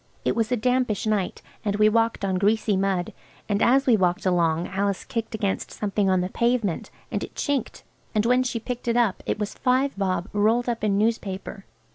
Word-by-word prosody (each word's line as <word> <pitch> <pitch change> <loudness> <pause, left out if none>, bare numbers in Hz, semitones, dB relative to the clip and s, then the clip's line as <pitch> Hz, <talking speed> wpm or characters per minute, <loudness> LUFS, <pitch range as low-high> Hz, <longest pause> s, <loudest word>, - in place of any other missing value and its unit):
It - - +1
was 225 0 0
a 250 - +2
dampish 250 -3 0
night, 210 -4 -1 0.2
and 205 -2 0
we 210 0 +5
walked 225 -1 +1
on 190 -1 0
greasy 210 +1 +2
mud. 190 -2 0 0.3
And 205 0 0
as 270 +3 +4
we 245 - +5
walked 180 -3 +1
along 170 -2 +2
Alice 200 0 -1
kicked 225 -1 -3
against 200 -3 -2
something 205 -1 -1
on 185 -1 +3
the 180 - -2
pavement, 235 -6 0 0.2
and - - -2
it - - -9
chinked, 280 -5 -2 0.3
and 210 +1 +2
when 250 +2 +4
she 245 -2 -2
picked 245 +1 -6
it 235 0 +2
up 230 -6 +2
it - - 0
was 210 -1 -3
five 260 +2 +1
bob 185 -2 -1
rolled 220 +4 +2
up 235 -3 -2
in 200 -2 +2
newspaper. 205 -2 -2
210 Hz, 200 wpm, -25 LUFS, 195-235 Hz, 0.3 s, we